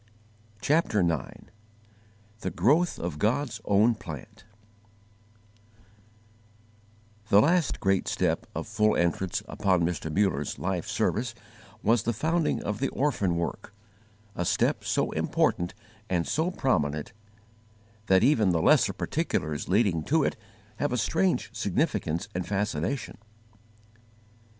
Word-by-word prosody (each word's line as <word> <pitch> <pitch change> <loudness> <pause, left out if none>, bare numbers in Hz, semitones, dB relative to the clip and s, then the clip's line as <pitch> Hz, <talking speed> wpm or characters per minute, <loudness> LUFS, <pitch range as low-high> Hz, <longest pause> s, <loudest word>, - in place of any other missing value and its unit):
CHAPTER 145 - +2
IX 80 -6 -2 0.9
THE 95 - -3
GROWTH 145 - +2
OF 85 -3 -4
GOD'S 120 - 0
OWN 105 +4 +4
PLANT 80 - -10 2.8
THE 100 - +7
last 170 +6 +2
great 95 -1 +1
step - - 0
of - - -3
full 105 0 +2
entrance 85 +1 0
upon 95 -3 +1
Mr. 85 -2 -2
Muller's 85 -6 0
life - - -2
service 115 0 -1 0.5
was 115 +1 +3
the 115 +1 -1
founding 160 +8 0
of 105 0 -3
the 135 - 0
orphan 105 -11 0
work, 85 +4 -4 0.6
a 90 - -1
step - - +1
so - - 0
important 90 0 0 0.3
and 85 -3 0
so 160 +3 0
prominent 75 - -1 0.9
that 95 +1 +5
even 115 -7 +4
the 85 -2 +2
lesser - - +4
particulars 75 +1 -2
leading 95 -4 +2
to 160 +1 +2
it - - 0 0.4
have 145 - -1
a 125 - 0
strange 95 -4 0
significance 85 +7 -1
and 90 0 -3
fascination. 100 - -2
100 Hz, 115 wpm, -27 LUFS, 85-125 Hz, 2.8 s, THE